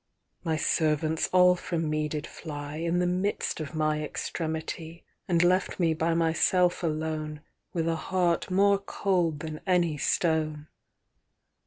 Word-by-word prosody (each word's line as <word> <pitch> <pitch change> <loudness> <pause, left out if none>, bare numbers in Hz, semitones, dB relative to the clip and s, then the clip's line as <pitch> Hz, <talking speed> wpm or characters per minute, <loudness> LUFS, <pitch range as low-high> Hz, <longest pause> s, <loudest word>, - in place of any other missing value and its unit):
VMy 160 -1 +1
servants 155 0 +1
all 180 0 +6
from 165 -2 -2
me 155 0 0
did 150 0 -3
flyIn 155 +2 -4
the 180 - +2
midst 185 +2 -1
of 155 0 -6
my 155 -1 +1
extremity, 160 +2 -4 0.2
And 175 -1 +3
left 185 +2 +2
me 165 -2 +3
by 165 +1 0
myself 170 +2 +2
aloneWith 155 -2 -3 0.4
a 165 - +1
heart 180 0 0
more 200 +1 +4
cold 180 -6 0
than 155 -1 -6
any 170 -5 +2
stone. 155 -2 0
160 Hz, 130 wpm, -28 LUFS, 155-180 Hz, 0.4 s, all